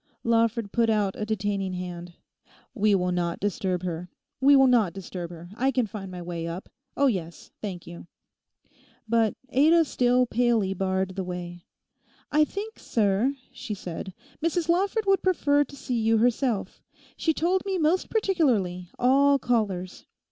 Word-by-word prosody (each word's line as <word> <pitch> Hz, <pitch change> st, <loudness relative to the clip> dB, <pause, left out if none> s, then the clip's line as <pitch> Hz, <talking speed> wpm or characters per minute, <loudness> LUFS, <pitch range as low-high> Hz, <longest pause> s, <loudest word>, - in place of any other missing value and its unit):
Lawford 230 Hz, -2 st, +1 dB
put 230 Hz, -1 st, +2 dB
out 205 Hz, -3 st, +1 dB
a 210 Hz, -, -4 dB
detaining 200 Hz, -3 st, -1 dB
hand. 175 Hz, -1 st, -6 dB, 0.6 s
'We 210 Hz, -4 st, +3 dB
will 180 Hz, -1 st, 0 dB
not 175 Hz, -1 st, -1 dB
disturb 185 Hz, -2 st, -1 dB
her; 175 Hz, 0 st, -4 dB, 0.3 s
we 280 Hz, +2 st, +6 dB
will 270 Hz, -1 st, +6 dB
not 230 Hz, -9 st, +3 dB
disturb 180 Hz, -2 st, -6 dB
her. 170 Hz, 0 st, -11 dB
I 260 Hz, +4 st, +1 dB
can 255 Hz, -3 st, +1 dB
find 195 Hz, -2 st, -7 dB
my 180 Hz, -1 st, -7 dB
way 170 Hz, -1 st, -4 dB
up; 170 Hz, +3 st, -6 dB, 0.3 s
oh 280 Hz, -, +3 dB
yes, 180 Hz, -10 st, -2 dB
thank 185 Hz, -5 st, -5 dB
you!' 170 Hz, 0 st, -10 dB, 1.0 s
But 225 Hz, -1 st, +2 dB
Ada 320 Hz, +6 st, +5 dB
still 250 Hz, -2 st, +2 dB
palely 235 Hz, -5 st, +1 dB
barred 190 Hz, 0 st, -1 dB
the 190 Hz, -, -2 dB
way. 175 Hz, -1 st, -7 dB, 0.7 s
'I 305 Hz, +1 st, +4 dB
think, 420 Hz, +6 st, -7 dB
sir,' 220 Hz, +5 st, +1 dB, 0.2 s
she 210 Hz, -, -5 dB
said, 180 Hz, 0 st, -7 dB, 0.3 s
'Mrs 335 Hz, 0 st, 0 dB
Lawford 395 Hz, +5 st, +1 dB
would 390 Hz, -2 st, +3 dB
prefer 290 Hz, -6 st, +3 dB
to 280 Hz, -, -13 dB
see 250 Hz, -3 st, -3 dB
you 225 Hz, 0 st, +3 dB
herself; 235 Hz, -3 st, 0 dB, 0.3 s
she 325 Hz, -, +1 dB
told 355 Hz, +4 st, +1 dB
me 390 Hz, -1 st, -1 dB
most 335 Hz, +3 st, +1 dB
particularly 240 Hz, -, +1 dB
"all 280 Hz, +3 st, +4 dB
callers." 205 Hz, -8 st, -2 dB
220 Hz, 155 wpm, -26 LUFS, 185-275 Hz, 1.0 s, we